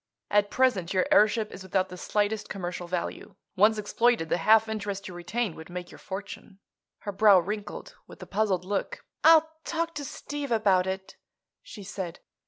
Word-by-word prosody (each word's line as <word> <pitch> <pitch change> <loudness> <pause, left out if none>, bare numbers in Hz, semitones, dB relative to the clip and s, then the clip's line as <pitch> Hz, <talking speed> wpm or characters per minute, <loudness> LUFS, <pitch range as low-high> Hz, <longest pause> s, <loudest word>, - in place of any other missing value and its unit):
At 205 0 +3
present 200 -9 +1
your 185 - +3
airship 215 +1 +4
is 185 - -9
without 190 0 0
the 180 - -8
slightest 210 +3 -1
commercial 175 -2 -5
value. 175 0 -4 0.2
Once 215 +3 +4
exploited, 215 -3 +1
the - - +1
half 220 +5 +5
interest 205 -2 -4
you 185 - -8
retain 175 +4 -2
would 160 - -11
make 175 0 -7
your - - -13
fortune." 195 0 -8 0.4
Her 205 - -4
brow 200 0 +6
wrinkled 205 +4 -5
with - - -13
a - - -8
puzzled 195 -3 0
look. 205 - -3 0.2
"I'll 320 0 +7 0.2
talk 335 0 -2
to 295 -2 -5
Steve 285 0 -6
about 195 -5 +3
it," 190 0 -5 0.4
she 205 - -11
said. 190 -3 -6
205 Hz, 175 wpm, -27 LUFS, 185-220 Hz, 0.4 s, I'll